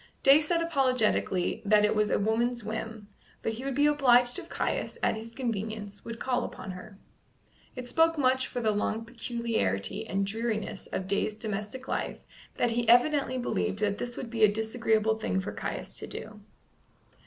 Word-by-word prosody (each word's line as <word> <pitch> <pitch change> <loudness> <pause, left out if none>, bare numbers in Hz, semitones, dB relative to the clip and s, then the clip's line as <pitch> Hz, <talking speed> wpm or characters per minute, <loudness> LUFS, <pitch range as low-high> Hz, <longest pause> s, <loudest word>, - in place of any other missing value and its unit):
Day 275 +2 +8
said 335 +2 +1
apologetically 255 - +1
that 210 0 +5
it 210 - +2
was 215 -1 +2
a - - +2
woman's 235 +3 0
whim, 220 0 -5 0.4
but - - 0
he 235 +4 -6
would 270 -1 -2
be 290 +2 +4
obliged 250 -4 +4
if - - -11
Caius, - - -2
at - - +3
his 225 +1 -9
convenience, 215 -4 -4
would 230 0 -7
call 250 -1 0
upon 190 - -6
her. 185 +2 -10 0.8
It 250 -1 -6
spoke 325 +4 +3
much 260 -2 +3
for 245 - -4
the 220 -2 +2
long 215 +2 -1
peculiarity 225 - -2
and 195 +1 0
dreariness 215 -1 -3
of 185 - -3
Day's 200 +2 0
domestic 215 +4 -5
life - - -2 0.4
that 240 - +1
he 235 0 0
evidently 255 +2 +4
believed 220 -5 -1
that 205 -1 0
this 240 0 -4
would 235 - -6
be 225 -2 +1
a 210 - +7
disagreeable 220 0 +1
thing 190 -3 0
for 190 - -4
Caius - - -5
to - - -6
do. 215 0 -8
225 Hz, 175 wpm, -29 LUFS, 210-250 Hz, 0.8 s, Day